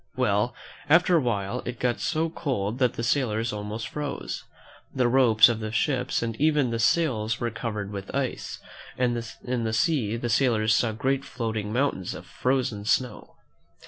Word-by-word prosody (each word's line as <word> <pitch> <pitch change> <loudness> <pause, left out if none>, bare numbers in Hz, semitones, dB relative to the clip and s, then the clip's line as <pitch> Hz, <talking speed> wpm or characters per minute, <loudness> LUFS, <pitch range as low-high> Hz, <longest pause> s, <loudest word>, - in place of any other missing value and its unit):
Well, 110 -2 +1 0.3
after 175 +3 +5
a 165 - +4
while 100 -6 -1
it 120 0 -6
got 125 -1 0
so 160 0 0
cold 125 -8 -2
that 125 -3 +3
the 115 - -4
sailors 115 -3 0
almost 105 +2 -4
froze. 145 -1 -4 0.5
The 125 -2 +3
ropes 120 -4 +6
of 115 -2 -1
the 110 -1 -4
ships 125 +1 0
and 115 -1 -2
even 150 -5 +3
the 115 - -1
sails 115 -5 +1
were 120 -1 -1
covered 105 -3 -4
with 100 -1 -6
ice, 135 -2 -2 0.4
and 125 -1 +2 0.3
in 125 -2 -2
the 110 -1 -1
sea 120 - +1
the 120 - -3
sailors 110 -3 +3
saw 110 +1 +2
great 130 +5 -1
floating 110 -5 -3
mountains 120 -7 -1
of 90 - -9
frozen 125 +2 -1
snow. 110 +1 -1
120 Hz, 170 wpm, -26 LUFS, 110-130 Hz, 0.5 s, ropes